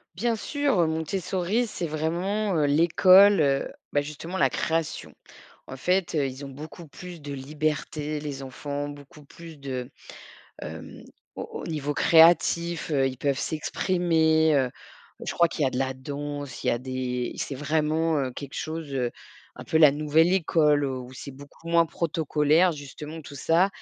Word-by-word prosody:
Bien 230 +4 0
sûr, 275 - +1
Montessori 185 +7 -1
c'est 175 -5 -4
vraiment, 175 +7 -1
heu, 150 - +3
l'école, 185 +6 +6
heu, 140 -2 +1 0.2
bah, 145 - +3
justement, 150 +5 -7
la 190 - +3
création, 165 -1 -2 0.5
en 130 - -8
fait, 180 +5 0
heu, 150 -3 +2
ils 130 +2 -8
ont - - -7
beaucoup 155 +5 -10
plus 175 +3 -10
de 145 -1 -7
liberté 150 +2 -3
les 140 -2 -6
enfants, 145 +2 -5
beaucoup 145 +2 -12
plus 165 +2 -12
de, 130 -3 -5 0.7
hem, - - -8 0.3
au - - -5 0.2
au - - -7
niveau 150 -3 -2
créatif, 170 +1 +4
heu, 135 -3 +2
ils 130 -1 -4
peuvent 140 -1 0
s'exprimer, 160 -1 +1
heu, 130 -3 +2 0.6
je - - -1
crois 170 - +4
qu'il 160 - -3
y - - +3
a - - +1
de 125 - -3
la 130 0 0
danse, 145 +1 -6
il - - +1
y - - +5
a 120 - 0
des 125 -1 -3
c'est 140 - -4
vraiment, 155 +3 0
heu, 135 -2 -1
quelque 140 +2 -8
chose, 160 -1 -5
heu, 125 -2 0 0.5
un - - -9
peu - - -1
la 155 -3 +7
nouvelle 155 +4 +3
école, 150 -5 +3
où 130 -1 -5
c'est 135 +2 -9
beaucoup 145 +4 -13
moins 170 0 +4
protocolaire, 160 +1 +2
justement, 150 +2 -8
tout 140 -1 -11
ça. 165 +6 +3
155 Hz, 170 wpm, -26 LUFS, 140-170 Hz, 0.7 s, la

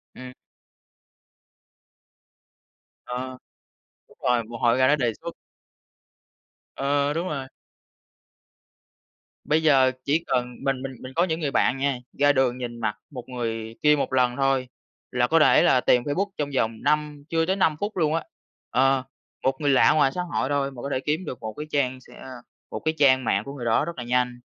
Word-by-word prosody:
Ừm. 130 0 -9 2.7
Ờ, 130 +1 -5 0.7
đúng - - -22
rồi, 120 -1 +2
một 115 +1 -8
hồi 120 +1 +3
ra 130 - +4
nó 150 - +5
đề 125 -6 0
xuất. 170 0 -7 1.4
Ờ, 140 +1 +1
đúng 170 +3 -2
rồi! 135 -4 -4 2.0
Bây 155 +2 +1
giờ 135 -4 +5
chỉ 155 +4 +1
cần 125 -1 -1
mình 135 -1 0
mình 135 -1 -6
mình 130 +1 -9
có 170 - +3
những 165 -2 -1
người 145 -3 -2
bạn 135 - +2
nha 135 -1 0 0.2
ra 145 0 +5
đường 130 -2 +1
nhìn 120 -2 -6
mặt 105 -2 -1
1 125 -3 -9
người 115 -2 -4
kia 150 0 +5
1 140 - -2
lần 125 -1 +2
thôi 135 -2 +1 0.4
là 125 -1 +1
có 165 +3 +4
thể - - +5
là 130 - +4
tìm 125 -1 +3
Facebook 185 +8 -1
trong 145 -1 -2
vòng 110 -2 0
năm 150 0 0
chưa 165 0 +1
tới 190 +3 +1
5 160 -6 +2
phút 205 -1 -4
luôn 155 -2 +2
á. 165 - -1 0.5
Ờ, 135 +1 +2 0.4
1 130 0 +2
người 145 - +2
lạ 135 - +5
ngoài 145 -3 +3
xã 180 - -1
hội 170 -6 -2
thôi 140 -1 0
mà 125 -3 -10
có 140 - -4
thể - - 0
kiếm 155 +6 -2
được 130 - -6
1 110 -1 -5
cái 150 - -6
trang 130 -3 0
sẽ, - - -17
a, - - -11 0.4
1 - - -4
cái 160 - -1
trang 130 -2 +4
mạng 100 -3 +1
của 140 - -8
người 125 -4 -7
đó 115 -1 +2
rất 170 -4 -6
là 125 - -4
nhanh. 125 0 0
135 Hz, 190 wpm, -25 LUFS, 125-150 Hz, 2.7 s, nó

